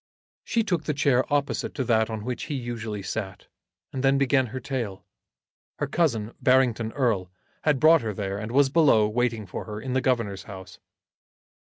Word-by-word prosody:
She 230 Hz, -, 0 dB
took 175 Hz, -7 st, -1 dB
the 150 Hz, -, -1 dB
chair 135 Hz, -2 st, +2 dB
opposite 145 Hz, -1 st, -1 dB
to 130 Hz, -, -1 dB
that 110 Hz, -2 st, +2 dB
on 110 Hz, -1 st, -5 dB
which 125 Hz, -1 st, -3 dB
he 150 Hz, -, -4 dB
usually 115 Hz, -5 st, -4 dB
sat, 95 Hz, 0 st, -5 dB, 0.5 s
and 130 Hz, -, -3 dB
then 135 Hz, 0 st, +4 dB
began 135 Hz, -1 st, +2 dB
her 130 Hz, +3 st, -5 dB
tale. 115 Hz, -6 st, -4 dB, 0.7 s
Her -, -, -1 dB
cousin, 120 Hz, -10 st, 0 dB
Barrington 125 Hz, -4 st, +3 dB
Erle, 110 Hz, -10 st, 0 dB, 0.4 s
had 150 Hz, -4 st, +3 dB
brought 160 Hz, +2 st, +6 dB
her 110 Hz, -2 st, -2 dB
there, 100 Hz, 0 st, -3 dB
and 110 Hz, +2 st, -5 dB
was 135 Hz, +1 st, +4 dB
below, 135 Hz, -9 st, +4 dB
waiting 115 Hz, -1 st, -1 dB
for 90 Hz, -, -6 dB
her 105 Hz, -1 st, -6 dB
in 125 Hz, +3 st, -4 dB
the 130 Hz, -, +2 dB
Governor's 115 Hz, -8 st, -1 dB
house. 95 Hz, -1 st, -10 dB
120 Hz, 180 wpm, -26 LUFS, 110-135 Hz, 0.7 s, brought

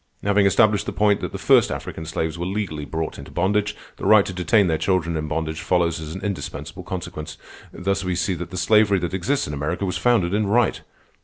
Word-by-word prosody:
Having 100 Hz, 0 st, +3 dB
established 105 Hz, +1 st, +3 dB
the -, -, -1 dB
point 105 Hz, -1 st, +2 dB
that -, -, -4 dB
the -, -, -5 dB
first -, -, +4 dB
African 80 Hz, -, -6 dB
slaves 80 Hz, -1 st, -2 dB
were 85 Hz, 0 st, -4 dB
legally 95 Hz, -7 st, -3 dB
brought 80 Hz, +1 st, -4 dB
into -, -, -10 dB
bondage, 105 Hz, +3 st, 0 dB, 0.2 s
the -, -, -6 dB
right 110 Hz, -2 st, +6 dB
to 95 Hz, -, -5 dB
detain 90 Hz, +3 st, +3 dB
their 80 Hz, -3 st, 0 dB
children 85 Hz, -3 st, 0 dB
in 75 Hz, -1 st, -2 dB
bondage 80 Hz, +1 st, -3 dB
follows 85 Hz, -1 st, +1 dB
as 80 Hz, 0 st, -7 dB
an 95 Hz, -, -7 dB
indispensable 100 Hz, -3 st, -5 dB
consequence. 80 Hz, -4 st, -6 dB, 0.3 s
Thus 100 Hz, +1 st, -2 dB
we 90 Hz, -1 st, -1 dB
see 90 Hz, +2 st, 0 dB
that 85 Hz, -1 st, -6 dB
the 90 Hz, -, -7 dB
slavery 105 Hz, +2 st, +4 dB
that 85 Hz, 0 st, -3 dB
exists 130 Hz, +10 st, 0 dB
in 75 Hz, -, -5 dB
America 75 Hz, +7 st, -2 dB
was 90 Hz, -, -2 dB
founded 110 Hz, -8 st, +2 dB
in 105 Hz, 0 st, +1 dB
right. 115 Hz, +2 st, +2 dB
90 Hz, 220 wpm, -22 LUFS, 80-100 Hz, 0.3 s, right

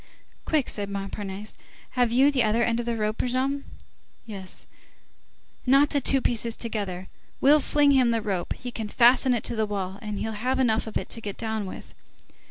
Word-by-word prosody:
"Quick!" 305 Hz, -5 st, +1 dB
said 200 Hz, -1 st, -2 dB
Montparnasse, 200 Hz, +1 st, -5 dB, 0.4 s
"have 245 Hz, -3 st, +1 dB
you 265 Hz, +4 st, +5 dB
the 270 Hz, -3 st, +2 dB
other 225 Hz, +1 st, +2 dB
end 235 Hz, 0 st, +1 dB
of 240 Hz, -, -4 dB
the 235 Hz, -1 st, -1 dB
rope, 215 Hz, 0 st, -1 dB
Brujon?" 265 Hz, +3 st, -1 dB, 0.6 s
"Yes." 195 Hz, -4 st, -4 dB, 1.0 s
"Knot 275 Hz, +3 st, +5 dB
the 285 Hz, -, +1 dB
two 270 Hz, +1 st, +2 dB
pieces 235 Hz, -1 st, 0 dB
together, 200 Hz, -5 st, -4 dB, 0.3 s
we'll 295 Hz, +3 st, +6 dB
fling 290 Hz, 0 st, +3 dB
him 260 Hz, -3 st, +4 dB
the 230 Hz, -1 st, +1 dB
rope, 195 Hz, -5 st, -2 dB
he 245 Hz, -, -7 dB
can 220 Hz, -3 st, -5 dB
fasten 250 Hz, +2 st, +5 dB
it 230 Hz, -, -3 dB
to -, -, -1 dB
the 220 Hz, -1 st, 0 dB
wall, 195 Hz, -1 st, -4 dB
and 210 Hz, -2 st, -5 dB
he'll 220 Hz, -, -3 dB
have 250 Hz, +5 st, -1 dB
enough 225 Hz, -4 st, +1 dB
of 220 Hz, -, -2 dB
it -, -, -5 dB
to 230 Hz, -, -2 dB
get 205 Hz, -3 st, -6 dB
down 220 Hz, -3 st, -3 dB
with." -, -, -9 dB
230 Hz, 190 wpm, -26 LUFS, 210-255 Hz, 1.0 s, we'll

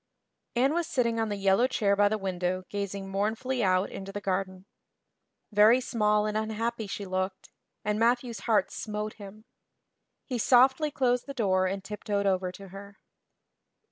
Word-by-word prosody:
Anne 265 Hz, +5 st, +3 dB
was 340 Hz, 0 st, 0 dB
sitting 235 Hz, -4 st, 0 dB
on 225 Hz, -1 st, 0 dB
the 205 Hz, -, -2 dB
yellow 195 Hz, +5 st, +3 dB
chair 205 Hz, -6 st, +1 dB
by 205 Hz, 0 st, +4 dB
the 215 Hz, -, 0 dB
window 185 Hz, -2 st, -2 dB
gazing 200 Hz, -1 st, -4 dB
mournfully 220 Hz, +6 st, -1 dB
out 185 Hz, 0 st, +2 dB
into 195 Hz, 0 st, -7 dB
the 205 Hz, -, -4 dB
garden. 190 Hz, -1 st, -3 dB, 0.9 s
Very 215 Hz, +4 st, +6 dB
small 210 Hz, -4 st, +1 dB
and 215 Hz, 0 st, -2 dB
unhappy 220 Hz, +1 st, -2 dB
she 200 Hz, 0 st, -5 dB
looked, 185 Hz, 0 st, -3 dB, 0.3 s
and 210 Hz, 0 st, 0 dB
Matthew's 235 Hz, -1 st, +1 dB
heart 220 Hz, -, +3 dB
smote 210 Hz, 0 st, -4 dB
him. 210 Hz, +2 st, -11 dB, 0.8 s
He 250 Hz, -3 st, -3 dB
softly 260 Hz, +6 st, +4 dB
closed 250 Hz, -3 st, 0 dB
the 275 Hz, -, -6 dB
door 185 Hz, -5 st, +2 dB
and 195 Hz, +1 st, -3 dB
tiptoed 205 Hz, 0 st, -3 dB
over 185 Hz, -2 st, +1 dB
to 195 Hz, +1 st, -12 dB
her. 200 Hz, +2 st, -11 dB
210 Hz, 160 wpm, -28 LUFS, 195-235 Hz, 0.9 s, Very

